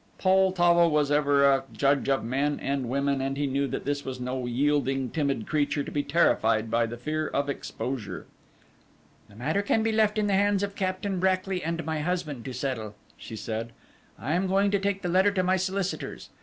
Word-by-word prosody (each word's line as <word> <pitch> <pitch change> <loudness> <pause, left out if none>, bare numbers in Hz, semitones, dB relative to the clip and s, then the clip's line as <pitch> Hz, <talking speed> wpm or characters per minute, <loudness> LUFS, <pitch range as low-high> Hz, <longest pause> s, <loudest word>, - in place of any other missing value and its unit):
Poltavo 185 -3 +4
was 150 -2 +1
ever 145 -1 +4
a 135 -1 +4
judge 140 0 +1
of 135 - +1
men 140 +5 -1
and 135 -3 -2
women, 140 +1 0
and 135 +1 -2
he 145 - 0
knew 140 +1 0
that - - -4
this 145 0 -1
was 130 -1 -6
no 125 0 -3
yielding, 135 0 0
timid 140 -7 -1
creature 145 -1 0
to - - -7
be 145 - 0
terrified 115 -8 +2
by 115 0 +2
the 120 +1 -7
fear 155 +5 -2
of 140 0 -1
exposure. 125 -7 -5 1.0
"The 100 - -17
matter 155 - 0
can 220 +2 +1
be 225 - +1
left 215 -1 +2
in 210 - +2
the 200 - +1
hands 200 0 +2
of 200 0 -3
Captain 185 0 -2
Brackly 185 0 0
and 170 +1 -3
my 160 -1 -2
husband 155 -6 -3
to 130 - -4
settle," 115 -6 -4 0.2
she 110 - -9
said. 115 +1 -5 0.4
"I 145 +5 -3
am 185 +2 +1
going 195 +2 +2
to 200 - +2
take 200 0 -1
the - - -1
letter 190 +3 +4
to 185 -2 +1
my 185 +1 +2
solicitors. 190 +1 -3
145 Hz, 200 wpm, -27 LUFS, 135-185 Hz, 1.0 s, Poltavo